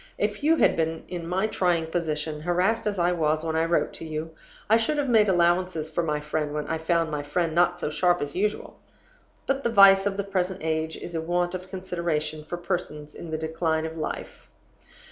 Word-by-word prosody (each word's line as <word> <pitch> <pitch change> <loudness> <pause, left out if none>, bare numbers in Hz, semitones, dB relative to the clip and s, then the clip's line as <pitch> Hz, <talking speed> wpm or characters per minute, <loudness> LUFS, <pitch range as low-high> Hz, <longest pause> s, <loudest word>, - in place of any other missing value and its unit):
If - - -1
you 315 +3 +4
had - - +4
been 160 0 -1
in 175 -2 -5
my 185 +4 0
trying 175 -6 +1
position, 155 -2 -3
harassed 180 +7 +1
as 205 -1 -1
I 175 0 +2
was 155 -2 +1
when 160 -1 -2
I 160 +1 +2
wrote 170 +1 +1
to - - -7
you, 155 0 -5 0.4
I 220 - +5
should 230 +7 0
have 290 -1 0
made 220 -4 +4
allowances 175 -2 +1
for 165 - 0
my 150 -3 -1
friend 150 0 -3
when 150 -1 -2
I 160 - -2
found 165 0 +1
my 150 -1 -2
friend 160 +3 -1
not 175 +1 +3
so 150 - -2
sharp 175 +2 +2
as 145 0 -4
usual. 210 +3 -2 0.7
But 275 0 -1
the - - +1
vice 195 -2 +7
of 195 -1 -2
the 200 - 0
present 190 -2 -2
age 160 0 -1
is 175 - -6
a 165 - -1
want 175 +2 0
of 185 0 -6
consideration 170 -5 -3
for 175 +3 -5
persons 170 -4 -4
in 170 - -9
the 160 - -2
decline 160 0 -1
of 160 0 -5
life. 155 - -6
170 Hz, 215 wpm, -26 LUFS, 160-185 Hz, 0.7 s, vice